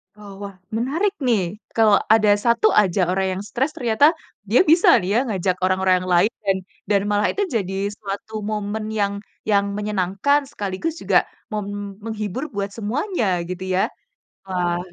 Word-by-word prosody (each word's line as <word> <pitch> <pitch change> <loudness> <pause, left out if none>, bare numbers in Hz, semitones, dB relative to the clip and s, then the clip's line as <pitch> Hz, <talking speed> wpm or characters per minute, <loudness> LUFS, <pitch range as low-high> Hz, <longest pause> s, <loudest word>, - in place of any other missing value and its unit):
Oh 205 -1 -12
wah, 200 -1 -7 0.2
menarik 305 - 0
nih, 210 -6 0 0.2
kalau 215 -3 +5 0.2
ada 215 -2 +4
1 235 - +4
aja 195 -2 +3
orang 190 +1 0
yang - - -4
stres 270 +5 0
ternyata, 285 +4 +3 0.3
dia 240 - +5
bisa 340 +4 +5
nih 180 - -3
ya, 230 - +4
ngajak 190 -4 0
orang-orang 185 0 +2
yang 185 - -5
lain 200 +7 +4
dan 195 -1 +2 0.3
dan 200 -2 +3
malah 205 0 +2
itu 405 - 0
jadi 195 -3 -1 0.2
suatu 205 +1 -7
momen 210 0 -3
yang 205 -2 0 0.4
yang 200 -1 +3
menyenangkan 210 +7 +1
sekaligus 205 +7 -3
juga - - +3 0.2
mem 210 -2 -2 0.4
menghibur 220 +3 -4
buat 200 0 -2
semuanya 245 - -2 0.2
gitu 185 0 -5
ya? 190 - +3 0.6
Wah 180 -2 -1
210 Hz, 155 wpm, -22 LUFS, 195-235 Hz, 0.6 s, kalau